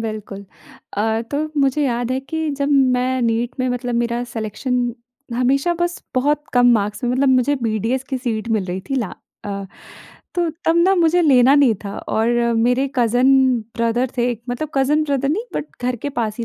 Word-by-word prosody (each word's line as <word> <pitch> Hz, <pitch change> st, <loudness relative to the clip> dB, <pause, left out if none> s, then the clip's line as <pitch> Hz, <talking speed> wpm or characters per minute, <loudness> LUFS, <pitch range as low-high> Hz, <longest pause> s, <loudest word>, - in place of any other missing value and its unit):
बिल्कुल। 215 Hz, -3 st, -6 dB, 0.5 s
अ, 220 Hz, +2 st, +1 dB
तो 285 Hz, -, -1 dB, 0.2 s
मुझे 275 Hz, +2 st, +2 dB
याद 245 Hz, -1 st, -1 dB
है 260 Hz, -, 0 dB
कि 320 Hz, +3 st, -3 dB
जब 280 Hz, -, +1 dB, 0.3 s
मैं 255 Hz, +1 st, 0 dB
नीट 235 Hz, +3 st, -1 dB
में 255 Hz, -, +1 dB
मतलब 245 Hz, -1 st, -2 dB
मेरा 235 Hz, 0 st, 0 dB
सिलेक्शन 245 Hz, +3 st, -2 dB, 0.5 s
हमेशा 275 Hz, +7 st, +1 dB
बस 345 Hz, 0 st, -1 dB
बहुत 295 Hz, +3 st, +1 dB
कम 245 Hz, -1 st, +4 dB
मार्क्स 210 Hz, +1 st, -1 dB
में 245 Hz, -, +1 dB
मतलब 265 Hz, +2 st, +2 dB
मुझे 260 Hz, +2 st, +3 dB
बीडीएस 230 Hz, +4 st, -1 dB
की 265 Hz, -2 st, -2 dB
सीट 230 Hz, -3 st, -3 dB
मिल 195 Hz, -, -3 dB
रही 185 Hz, +1 st, -4 dB
थी -, -, 0 dB
ला 225 Hz, -7 st, -2 dB, 0.3 s
अ, 200 Hz, -1 st, -4 dB, 0.7 s
तो 345 Hz, -2 st, +1 dB, 0.2 s
तब 330 Hz, +1 st, +3 dB
ना 370 Hz, +3 st, +4 dB
मुझे 345 Hz, -1 st, +3 dB
लेना 265 Hz, -3 st, +5 dB
नहीं 275 Hz, -6 st, +5 dB
था 200 Hz, -, -5 dB, 0.2 s
और 220 Hz, +1 st, +1 dB, 0.3 s
मेरे 250 Hz, +4 st, +2 dB
कज़िन 245 Hz, +1 st, +3 dB, 0.5 s
ब्रदर 235 Hz, +2 st, +1 dB
थे 240 Hz, -, +1 dB
एक 235 Hz, -1 st, -6 dB
मतलब 265 Hz, +5 st, -3 dB
कज़िन 285 Hz, +3 st, +2 dB
ब्रदर 275 Hz, -2 st, 0 dB
नहीं, 365 Hz, +10 st, 0 dB
बट -, -, -2 dB, 0.2 s
घर 245 Hz, 0 st, 0 dB
के 285 Hz, -, -4 dB
पास 225 Hz, -5 st, -2 dB
ही 235 Hz, -, -2 dB
250 Hz, 190 wpm, -20 LUFS, 230-275 Hz, 0.7 s, लेना